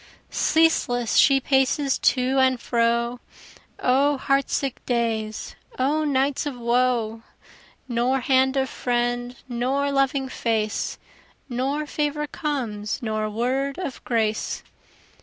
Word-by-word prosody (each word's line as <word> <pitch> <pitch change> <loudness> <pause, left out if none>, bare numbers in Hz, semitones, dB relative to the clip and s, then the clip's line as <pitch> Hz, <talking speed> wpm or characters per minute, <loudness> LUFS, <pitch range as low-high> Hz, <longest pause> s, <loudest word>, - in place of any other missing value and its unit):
Ceaseless 245 -8 +2
she 275 -2 +6
paces 270 +1 +1
to 260 +1 +2
and 260 -1 +3
fro, 235 +1 0 0.6
O 275 +3 +3
heart 275 +1 +1
sick 275 -3 -2
days! 225 -3 -2 0.2
O 290 +4 +1
nights 280 0 +1
of 275 -4 -5
woe! 235 -2 +1 0.7
Nor 250 +2 +1
hand 265 +1 +3
of 265 0 +1
friend, 245 0 -1
nor 260 +4 0
loving 275 -1 +1
face, 220 -4 -1 0.5
Nor 270 +5 -1
favor 300 0 -1
comes, 235 -9 -3
nor 215 -1 -1
word 260 +5 -1
of 355 -9 -5
grace. 220 -2 -1
255 Hz, 110 wpm, -24 LUFS, 235-275 Hz, 0.7 s, she